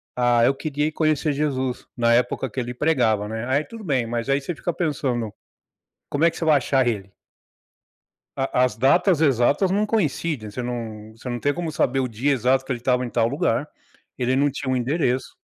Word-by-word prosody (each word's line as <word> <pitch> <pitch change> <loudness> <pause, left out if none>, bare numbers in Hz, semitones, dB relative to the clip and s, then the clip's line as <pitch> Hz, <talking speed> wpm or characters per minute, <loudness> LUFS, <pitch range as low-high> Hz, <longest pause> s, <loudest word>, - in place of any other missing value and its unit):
"Ah, 120 -1 +3
eu 135 - +4
queria 150 0 -1
ir - - -2
conhecer 155 -1 +1
Jesus 130 -3 -2
na 115 -1 +3
época 125 +2 +1
que 130 - -5
ele 120 0 -3
pregava, 120 -8 +1
né?" 110 +1 -4
Aí 140 +3 +1
tudo 225 +5 -10
bem, 135 - 0
mas 115 +2 -3
aí 140 +1 +2
você 170 +3 -4
fica 175 - -3
pensando. 130 - -2 0.8
Como 145 +3 0
é 170 - +6
que - - -13
você - - -3
vai 155 -2 +5
achar 130 -1 +1
ele? 100 -4 -2 1.3
A 135 0 -1
as 125 -5 -1
datas 160 - +3
exatas 140 - +3
não 205 +3 +1
coincidem. 155 - -1
Você 125 +4 -5
não 110 -3 -6
você 115 - -15
não 120 -1 -3
tem 145 0 +1
como 170 -3 -3
saber 135 -2 +1
o 130 - -1
dia 125 +6 0
exato 130 +1 +2
que - - -11
ele 120 -2 -2
estava 125 0 +1
em - - -4
tal 115 0 +1
lugar, 145 -1 0 0.5
ele 130 +1 +1
não 145 +1 +3
tinha 135 -1 -4
um 130 - +1
endereço. 130 0 -1
130 Hz, 210 wpm, -23 LUFS, 120-150 Hz, 1.3 s, é